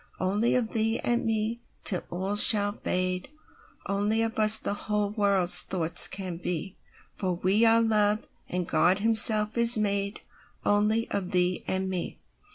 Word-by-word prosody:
Only 205 +5 -2
of 235 -3 -3
thee 225 0 -2
and 240 -1 -3
me, 225 +1 -4 0.2
till 180 - +1
all 190 +3 -6
shall 205 -1 +5
fade; 185 +1 -5 0.6
Only 205 +3 -2
of 225 0 -5
us 215 0 +7
the 210 - -3
whole 210 0 -4
world's 200 -4 +4
thoughts 170 -3 +4
can 185 -3 -8
be—For 180 +2 -8
we 195 +6 -1
are 230 0 +2
Love, 215 -1 -1 0.2
and 180 -1 -5
God 180 +2 0
Himself 220 0 +4
is 235 0 +6
madeOnly 205 +1 -4
of 190 -3 -5
thee 180 0 -2
and 190 0 -4
me. 185 -2 -7
205 Hz, 145 wpm, -24 LUFS, 185-220 Hz, 0.6 s, us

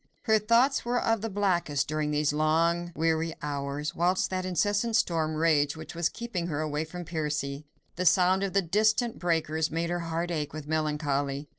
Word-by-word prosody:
Her 220 -2 +4
thoughts 235 +6 +3
were 245 +1 0
of 225 -2 +1
the 225 - -3
blackest 180 -8 0
during 155 0 -1
these 150 0 +1
long, 165 +3 +1
weary 160 0 0
hours, 145 +1 -3
whilst 180 +3 +1
that 185 0 -2
incessant 205 +5 +1
storm 160 -7 +1
raged 155 -2 +2
which 160 +1 -9
was 170 -1 0
keeping 205 -8 -4
her 150 -3 -3
away 155 0 -2
from 175 +2 -8
Percy. 150 -3 -3 0.3
The 180 0 +1
sound 185 +3 +4
of 195 -1 -2
the 195 0 +3
distant 215 +6 +1
breakers 160 -2 0
made 165 +2 -2
her 175 - -1
heart 170 +1 -3
ache 150 -4 -3
with 155 -1 -6
melancholy. 150 -2 -1
165 Hz, 180 wpm, -28 LUFS, 150-185 Hz, 0.3 s, Her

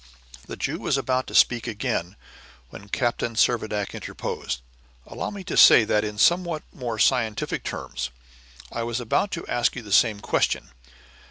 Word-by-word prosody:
The - - -7
Jew - - -2
was - - 0
about 130 0 -1
to - - -7
speak 120 -1 +4
again, 100 -4 -3 0.6
when 100 +1 -12
Captain 120 0 -1
Servadac 110 -3 +1
interposed: 60 - -5 0.4
"Allow - - -5
me 200 -2 -8
to 180 - -4
say 115 - +8
that, 105 0 +1
in 105 -1 -5
somewhat 170 - +2
more 120 -4 -4
scientific 115 -2 +1
terms, - - -5 0.6
I 115 - -3
was 120 +1 -2
about 120 - 0
to 170 - -4
ask 120 - 0
you 120 - -6
the 105 - -10
same 105 +1 +4
question. - - 0
115 Hz, 160 wpm, -24 LUFS, 105-125 Hz, 0.6 s, say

